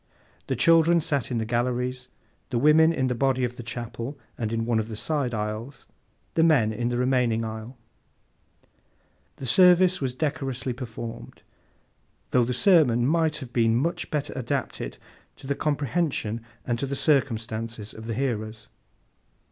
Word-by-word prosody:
The - - 0
children 165 +1 +5
sat 140 -5 -1
in 125 - -1
the 110 - -1
galleries; 125 +2 -1 0.4
the 125 - -1
women 155 +5 +5
in 135 -5 0
the 125 - 0
body 130 +1 +1
of 125 0 -2
the 125 - -7
chapel, 120 +3 -6 0.2
and 110 -2 -3
in 115 0 -1
one 115 -1 +1
of 110 - -2
the 110 - -6
side 140 +2 -1
aisles; 110 +5 -5 0.5
the 165 - +2
men 140 -10 +4
in 120 +2 -1
the 120 - -1
remaining 125 -3 +1
aisle. 110 +3 -7 1.6
The 135 - -8
service 180 +5 +5
was 130 -2 -2
decorously 130 -3 -2
performed, 115 -2 -8 0.9
though 125 -2 +4
the 125 - -2
sermon 125 - +4
might 160 +1 +2
have 130 -5 -8
been 115 -2 +3
much 160 +8 -1
better 150 -2 -2
adapted 125 -3 -3 0.4
to - - -14
the 140 - 0
comprehension 145 -6 -1 0.2
and 120 -1 -1
to 140 - -1
the 140 - -2
circumstances 115 -6 -1
of 110 0 -10
the 115 - -2
hearers. 110 -4 -3
125 Hz, 155 wpm, -26 LUFS, 115-145 Hz, 1.6 s, children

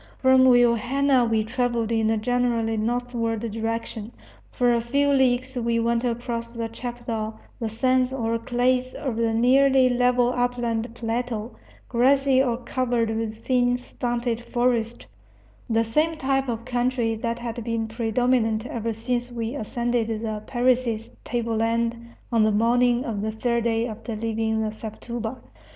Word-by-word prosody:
From 260 0 +5
Vilhena 245 +1 +4
we 220 -1 +2
travelled 235 0 -1
in 225 -1 +2
a 225 - +2
generally 235 -1 0
northward 230 0 -1
direction. 225 0 -4 0.4
For 245 -2 +2
a 235 - +1
few 280 +5 +1
leagues 260 -1 +2
we 235 -1 0
went 235 +1 +1
across 235 -1 -2
the 230 -1 -2
chapadao, 230 -2 -5 0.2
the 225 -2 -2
sands 255 +3 +1
or 230 -3 -1
clays 250 +2 0
of 260 -5 -3
the 230 0 +1
nearly 260 +3 +4
level 245 0 +2
upland 245 -2 -1
plateau, 235 -1 -3 0.3
grassy 265 +2 +3
or 245 -3 0
covered 240 -2 -1
with 225 0 -4
thin, 245 -1 +2
stunted 240 -1 -3
forest, 240 -1 0 0.6
the 225 0 +3
same 310 +8 +1
type 270 -2 0
of 230 0 -3
country 245 -2 0
that 230 +1 -3
had 235 -1 -5
been 230 -1 -2
predominant 225 0 +1
ever 230 -2 -3
since 240 +2 -2
we 230 0 -3
ascended 240 -2 -1
the 220 -1 -3
Parecis 240 -3 +1
table 230 -2 -2
land 230 +1 +1 0.4
on 230 -2 +3
the 215 - +3
morning 240 +3 +3
of 215 -4 -3
the 220 +1 -1
third 235 +1 -1
day 225 0 +1
after 225 0 -6
leaving 220 0 -1
the 215 - -2
Sepotuba. 225 +2 -6
235 Hz, 145 wpm, -24 LUFS, 225-250 Hz, 0.6 s, From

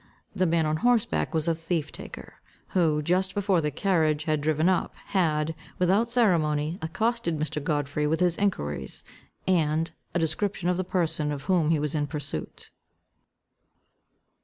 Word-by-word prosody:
The 185 -2 +2
man 165 -1 +2
on 155 0 +1
horse 240 +3 +3
back 75 -1 -1
was 160 0 0
a 165 - +3
thief 165 -1 -2
taker, - - -10 0.3
who, 155 -5 +2
just 185 +4 +1
before 195 -4 +2
the 150 - 0
carriage 155 -2 +1
had 155 -1 0
driven 155 +2 +2
up, 185 -1 +1
had, 160 -4 0 0.2
without 195 +6 +3
ceremony, 165 -8 +2
accosted 215 +1 -1
Mr. 150 -1 -2
Godfrey 150 0 0
with 160 +2 +1
his 180 -2 +3
enquiries, 75 - -2 0.4
and 160 -2 +2 0.2
a - - +4
description 175 +3 0
of 180 - +1
the 185 - 0
person 165 -5 0
of 145 -1 -4
whom 175 -5 +2
he 160 - +3
was 150 -1 -1
in 150 -2 0
pursuit. 145 - -5
160 Hz, 160 wpm, -27 LUFS, 150-185 Hz, 0.4 s, a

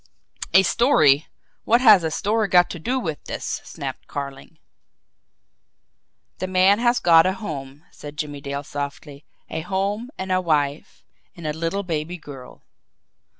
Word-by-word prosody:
"A 190 - +8
story! 160 - +3 0.4
What 235 +2 +4
has 215 -8 +7
a 160 - 0
story 210 +6 0
got 180 -1 +4
to 175 - -6
do 250 +10 -1
with 160 - -5
this?" - - -4
snapped - - -7
Carling. 140 +2 -7 1.8
"The 185 - -2
man 185 +3 +4
has 240 0 +2
got 165 -2 +6
a 190 - +1
home," 145 -8 -7
said 145 0 -11
Jimmie 145 -1 -5
Dale 140 0 -4
softly. 145 0 -7 0.3
"A 160 - -3
home, 200 +6 -2
and 190 0 -4
a 185 0 +2
wife 150 -3 -1 0.3
and 170 - -9
a 150 - -1
little 165 +5 -2
baby 165 0 -3
girl." 135 -5 -12
165 Hz, 150 wpm, -22 LUFS, 145-195 Hz, 1.8 s, A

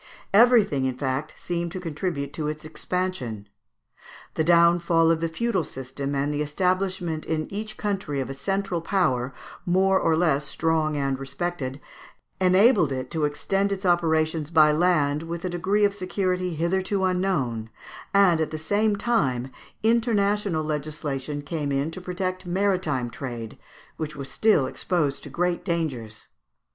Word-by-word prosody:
Everything, 215 - +5
in 130 -1 -2
fact, 135 +3 -2
seemed 170 -1 -3
to 185 - -4
contribute 155 -4 -3
to 155 -2 -3
its 155 0 -5
expansion. 155 - -3 0.9
The 160 - 0
downfall 170 0 +4
of 165 -1 0
the 165 - 0
feudal 195 +1 0
system 135 +1 -5
and 140 +2 0
the 145 - -1
establishment 180 +1 -1
in 155 -1 -1
each 215 +1 -5
country 195 -9 -2
of 130 - -2
a 135 - -5
central 195 +4 -2
power, 140 -9 +1 0.3
more 190 +2 +3
or 160 -1 +2
less 155 -4 +2
strong 155 0 0
and 135 -1 -1
respected, 135 -1 -4 0.6
enabled 185 - +5
it 130 -1 -4
to 160 -3 0
extend 195 +7 0
its 195 0 -3
operations 160 -3 +2
by 155 -2 +6
land 150 -3 +2
with 170 +1 -5
a - - -1
degree 195 +4 +2
of 200 - +1
security 185 -2 -1
hitherto 190 +4 0
unknown; 175 - 0 0.4
and, 190 -5 +4
at 155 - 0
the 155 - -4
same 205 +6 +1
time, 135 - 0 0.3
international 210 -6 +2
legislation 150 -1 -3
came 145 -1 -3
in 140 +3 0
to 185 - -8
protect 185 0 -3
maritime 175 -10 0
trade, 120 -5 -6 0.4
which 155 -1 -4
was 140 -1 -7
still 210 -11 +3
exposed 145 0 -1
to 145 - -9
great 175 +4 -1
dangers. 145 - -3
165 Hz, 150 wpm, -25 LUFS, 145-185 Hz, 0.9 s, by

